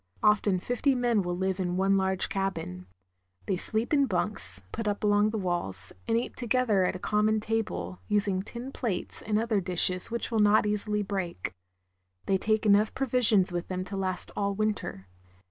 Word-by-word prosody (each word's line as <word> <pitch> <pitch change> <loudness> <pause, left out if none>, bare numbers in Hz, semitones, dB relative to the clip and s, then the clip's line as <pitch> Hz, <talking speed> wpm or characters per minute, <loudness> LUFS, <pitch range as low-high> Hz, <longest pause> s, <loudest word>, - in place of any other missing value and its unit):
Often 205 -3 +3
fifty 255 +5 +1
men 240 -4 +2
will 175 -1 -3
live 190 +1 -1
in 180 -1 -1
one 195 +1 +3
large 190 -1 +1
cabin. 95 - -4 0.6
They 195 - 0
sleep 220 - -1
in 280 -2 +4
bunks, 175 - 0
put 225 -1 -4
up 205 0 -2
along 205 0 +3
the 220 - -3
walls, 175 - -1
and 225 - +2
eat 235 - -3
together 240 -5 +1
at 185 - -1
a 185 - -7
common 215 +1 +2
table, 90 - -3
using 200 -2 +1
tin 235 +6 -8
plates 220 -10 -2
and 210 0 -1
other 220 -2 +1
dishes 180 0 +2
which 235 +1 -3
will 225 - +1
not 210 0 +4
easily 210 0 -1
break. 190 - -4 0.7
Th'ey 190 -1 +1
take 215 +2 0
enough 210 +1 +4
provisions 230 -7 +4
with 175 0 -3
them 185 0 -3
to 195 - -6
last 185 -1 -3
all 200 -1 -1
winter. 210 - -3
205 Hz, 180 wpm, -28 LUFS, 185-220 Hz, 0.7 s, in